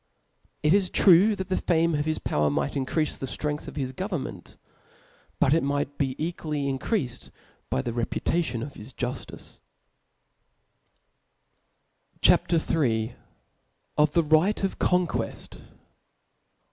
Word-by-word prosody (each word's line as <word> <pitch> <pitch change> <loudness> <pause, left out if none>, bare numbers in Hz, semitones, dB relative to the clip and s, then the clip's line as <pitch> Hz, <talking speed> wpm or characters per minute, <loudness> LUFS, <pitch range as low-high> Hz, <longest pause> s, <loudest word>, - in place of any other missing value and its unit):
It 150 +2 +4
is 195 -2 +3
true 195 +3 +6
the 190 -1 -2
fame 165 -1 +2
of 145 0 0
his 155 0 0
power 75 0 0
might 70 -1 -1
incriaft 150 +3 -1
the 135 - -4
ftren^th 150 +2 -3
of - - -8
his 130 -3 -3
governrpent; 145 - -5 0.8
but 135 - +4
it 165 - +3
might 145 0 -2
be 135 -2 0
equally 155 -3 -3
increaied 135 - -2 0.4
by 65 - 0
the 120 - -3
reputation 120 +2 -1
of 140 - -7
his 110 +5 -11
jufti^. 125 0 -6 2.6
CHAP. - - +5
IIL 130 -9 +1 0.8
OftheRightofConquefi. 170 +4 +1
150 Hz, 110 wpm, -26 LUFS, 130-170 Hz, 2.6 s, true